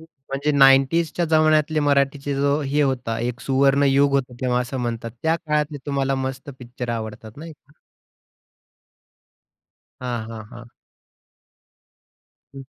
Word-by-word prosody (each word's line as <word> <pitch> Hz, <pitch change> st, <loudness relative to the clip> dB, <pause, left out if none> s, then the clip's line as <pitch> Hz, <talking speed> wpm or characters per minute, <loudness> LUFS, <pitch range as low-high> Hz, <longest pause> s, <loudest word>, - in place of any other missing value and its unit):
म्हणजे 140 Hz, -2 st, -5 dB
'90sच्या 140 Hz, +5 st, +4 dB
जमान्यातले 155 Hz, -1 st, +2 dB
मराठीचे 140 Hz, 0 st, +1 dB
जो 140 Hz, +2 st, +1 dB
हे 145 Hz, +1 st, 0 dB
होता, 125 Hz, -5 st, -1 dB
एक 120 Hz, +1 st, -3 dB
सुवर्णयुग 140 Hz, +1 st, +3 dB
होतं, 130 Hz, -2 st, -1 dB
तेव्हा 125 Hz, -1 st, +1 dB
असं 125 Hz, +2 st, -4 dB
म्हणतात. 115 Hz, -1 st, -4 dB
त्या 160 Hz, +1 st, +2 dB
काळातले 150 Hz, -2 st, -2 dB
तुम्हाला 135 Hz, -1 st, 0 dB
मस्त 130 Hz, +1 st, -4 dB
पिक्चर 125 Hz, 0 st, -8 dB
आवडतात, 110 Hz, -1 st, -6 dB
नाही 160 Hz, +2 st, -9 dB
का? 145 Hz, -1 st, -25 dB, 2.3 s
हां, 120 Hz, -3 st, -3 dB
हां, 110 Hz, -1 st, -8 dB
हां. 120 Hz, 0 st, -11 dB, 1.9 s
हं. 135 Hz, -, -9 dB
135 Hz, 115 wpm, -22 LUFS, 125-145 Hz, 2.3 s, 90sच्या